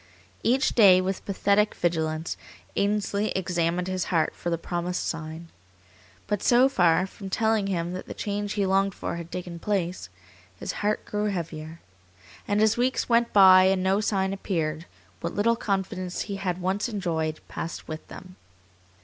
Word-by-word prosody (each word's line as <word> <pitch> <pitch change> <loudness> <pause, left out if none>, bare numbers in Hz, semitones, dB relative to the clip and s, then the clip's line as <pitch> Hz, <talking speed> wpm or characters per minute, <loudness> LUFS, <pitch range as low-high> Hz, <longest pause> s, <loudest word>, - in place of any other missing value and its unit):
Each 255 +3 +2
day, 195 -5 +7
with 185 +1 -2
pathetic 200 +1 +2
vigilance, 160 -1 -1 0.4
Ainsley 205 +1 0
examined 175 -1 0
his 185 -1 -1
heart 165 -3 +1
for 175 - -4
the 170 - 0
promised 175 +1 -3
sign. 165 +1 -5 0.8
But 205 -1 -1
so 250 +2 +5
far 180 -8 +3
from 195 0 -9
telling 220 0 +1
him 175 -2 -2
that 185 - -6
the - - -7
change 205 0 -3
he 200 -2 0
longed 195 0 +2
for - - -4
had 170 0 -8
taken 175 -1 -6
place, 180 - -2 0.5
his - - -3
heart 210 +1 0
grew 210 0 -2
heavier, 165 -4 -4 0.7
and 205 +1 +2
as 220 +1 +3
weeks 250 +1 0
went 235 0 +3
by 185 -2 +8
and 190 -1 +2
no 190 +2 +2
sign 195 -2 0
appeared, 165 -5 -2 0.3
what - - -4
little 230 +3 +3
confidence 190 -4 -2
he 200 -2 -4
had 185 -2 -2
once 190 +5 -1
enjoyed 165 -7 -2
passed 165 - -6
with 155 0 -7
them. 185 0 -12
190 Hz, 160 wpm, -26 LUFS, 170-205 Hz, 0.8 s, by